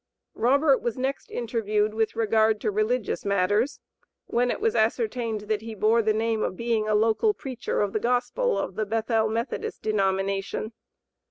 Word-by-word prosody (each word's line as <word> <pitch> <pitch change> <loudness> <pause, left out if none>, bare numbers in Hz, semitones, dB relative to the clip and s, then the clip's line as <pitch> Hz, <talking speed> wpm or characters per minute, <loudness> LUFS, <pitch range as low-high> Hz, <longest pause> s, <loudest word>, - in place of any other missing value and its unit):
Robert 275 +4 +3
was 240 0 -2
next 265 +2 -3
interviewed 215 -3 -1
with 220 0 0
regard 220 -1 +2
to - - 0
religious 215 +3 -1
matters, 205 +6 +1 0.5
when 245 +1 +1
it - - -1
was 450 +1 +1
ascertained 225 0 0
that 210 0 -2
he 225 0 -7
bore 220 +3 +3
the 220 -1 +2
name 220 0 0
of 185 - -2
being 230 -2 0
a 215 - +2
"local 225 - +2
preacher 255 -3 -3
of 205 -1 -1
the 215 - +1
gospel 250 - 0
of 185 - -3
the 215 +3 -2
Bethel 225 0 +1
Methodist 230 +3 -3
denomination." 195 +1 -1
220 Hz, 165 wpm, -26 LUFS, 215-240 Hz, 0.5 s, Robert